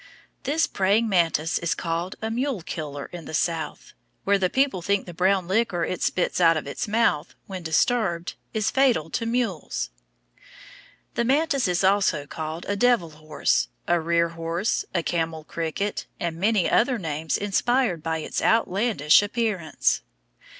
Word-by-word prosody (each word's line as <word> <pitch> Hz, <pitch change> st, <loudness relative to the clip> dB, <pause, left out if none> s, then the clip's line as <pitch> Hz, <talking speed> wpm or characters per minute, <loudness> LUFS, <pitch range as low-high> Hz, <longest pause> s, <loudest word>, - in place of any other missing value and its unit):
This 305 Hz, +5 st, +2 dB
praying 200 Hz, +4 st, +2 dB
mantis 170 Hz, -4 st, +1 dB
is 170 Hz, -1 st, -1 dB
called 170 Hz, +2 st, -3 dB
a 220 Hz, -, -1 dB
"mule 245 Hz, -, -1 dB
killer" 145 Hz, -4 st, -5 dB
in 170 Hz, -3 st, -7 dB
the 155 Hz, -, -5 dB
South, 160 Hz, -2 st, -2 dB, 0.3 s
where 200 Hz, 0 st, +3 dB
the 185 Hz, -1 st, +2 dB
people 265 Hz, -7 st, +1 dB
think 200 Hz, +3 st, 0 dB
the 175 Hz, -, -8 dB
brown 185 Hz, +1 st, +2 dB
liquor 190 Hz, -3 st, +1 dB
it 185 Hz, -, -4 dB
spits 180 Hz, 0 st, 0 dB
out 165 Hz, -1 st, +5 dB
of -, -, -4 dB
its 140 Hz, -, -4 dB
mouth, 215 Hz, -8 st, +1 dB
when 190 Hz, -2 st, -6 dB
disturbed, 175 Hz, +1 st, +1 dB, 0.2 s
is 215 Hz, -2 st, 0 dB
fatal 245 Hz, -, +2 dB
to 230 Hz, -, -2 dB
mules. 180 Hz, -, -2 dB, 1.2 s
The 235 Hz, -, 0 dB
mantis 275 Hz, 0 st, +2 dB
is 180 Hz, +1 st, 0 dB
also 190 Hz, -6 st, +2 dB
called 155 Hz, +3 st, -6 dB
a 205 Hz, -, 0 dB
devil 215 Hz, -7 st, +2 dB
horse, 155 Hz, -, 0 dB, 0.2 s
a 175 Hz, 0 st, +3 dB
rear 170 Hz, +1 st, +2 dB
horse, 165 Hz, +4 st, -2 dB
a 170 Hz, -2 st, 0 dB
camel 165 Hz, -2 st, -2 dB
cricket, 170 Hz, +6 st, -3 dB
and 170 Hz, -2 st, -2 dB
many 205 Hz, +1 st, +2 dB
other 250 Hz, +1 st, +3 dB
names 160 Hz, -4 st, -2 dB
inspired 205 Hz, -2 st, +1 dB
by 160 Hz, 0 st, -1 dB
its 155 Hz, -, -3 dB
outlandish 200 Hz, -8 st, +3 dB
appearance. 205 Hz, -7 st, 0 dB
180 Hz, 155 wpm, -25 LUFS, 165-220 Hz, 1.2 s, out